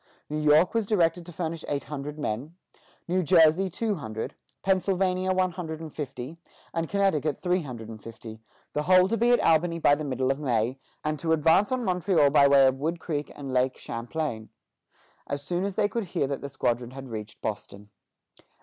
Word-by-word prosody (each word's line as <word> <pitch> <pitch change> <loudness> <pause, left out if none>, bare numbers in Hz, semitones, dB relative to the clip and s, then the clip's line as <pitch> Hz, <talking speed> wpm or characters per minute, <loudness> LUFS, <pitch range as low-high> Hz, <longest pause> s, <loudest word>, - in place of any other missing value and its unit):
New 150 - -1
York 150 +5 +4
was 225 -3 0
directed 175 -4 +1
to - - -8
furnish 165 -1 -4
eight 140 -1 -2
hundred 150 +1 -6
men; 145 +3 -4 0.5
New 185 +2 +1
Jersey, 170 +2 +5
two 215 +5 -1
hundred; 120 - -5 0.3
Pennsylvania, 185 -1 +1
one 185 -1 +2
hundred 165 -3 -6
and 160 -2 -8
fifty; 145 +1 -6 0.3
and 165 -1 -2
Connecticut, 190 -7 +1
three 180 0 0
hundred 120 -7 -7
and 110 -1 -9
fifty, 110 0 -10 0.3
the 150 - 0
whole 185 +3 +5
to 225 - 0
be 235 +1 +2
at 245 - +5
Albany 165 +1 +3
by 150 -3 +4
the 150 +1 0
middle 130 -2 0
of 135 - -2
May, 125 -2 0 0.2
and 155 -1 -2
to 160 -1 +1
advance 160 - +3
on 255 -2 -1
Montreal 180 -5 +3
by 140 -1 +6
way 140 -1 +6
of 130 0 +2
Wood 165 +4 -2
Creek 150 -3 -3
and 135 -2 -6
Lake 130 0 +1
Champlain, 115 -1 -4 0.8
as 140 0 -4
soon 175 +4 -2
as 200 -2 -3
they 210 0 +2
should 230 0 -3
hear 165 -5 -1
that 135 0 -3
the 140 - -5
squadron 120 -2 -1
had 135 +1 -9
reached 110 -2 -7
Boston. 105 -1 -6
155 Hz, 195 wpm, -27 LUFS, 135-180 Hz, 0.8 s, by